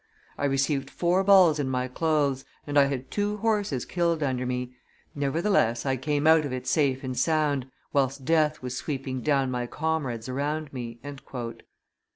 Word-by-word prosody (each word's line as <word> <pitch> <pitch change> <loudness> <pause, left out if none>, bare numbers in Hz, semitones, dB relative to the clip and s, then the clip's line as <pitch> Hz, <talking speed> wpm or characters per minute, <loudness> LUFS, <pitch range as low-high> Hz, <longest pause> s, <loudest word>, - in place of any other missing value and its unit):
"I - - -2
received 135 0 0
four 180 +2 +1
balls 185 -6 +6
in 135 -2 -1
my 125 -1 -1
clothes, 140 -1 0 0.2
and 145 - -4
I 140 -1 +7
had 135 -2 -4
two 205 0 -1
horses 205 - 0
killed 170 -3 0
under 130 -2 -1
me; 125 0 -3 0.4
nevertheless 140 - +1
I 135 -1 +1
came 145 +3 -1
out 160 0 +6
of 145 - -4
it 130 0 -4
safe 140 -4 +1
and 130 -1 -3
sound, 145 -1 +1 0.2
whilst 135 -1 0
death 155 -2 +2
was 125 0 -4
sweeping 135 -2 -4
down 135 -3 +1
my 125 -1 -2
comrades 145 -7 -2
around 145 +3 -3
me." 120 -2 -6
140 Hz, 165 wpm, -27 LUFS, 130-155 Hz, 0.4 s, I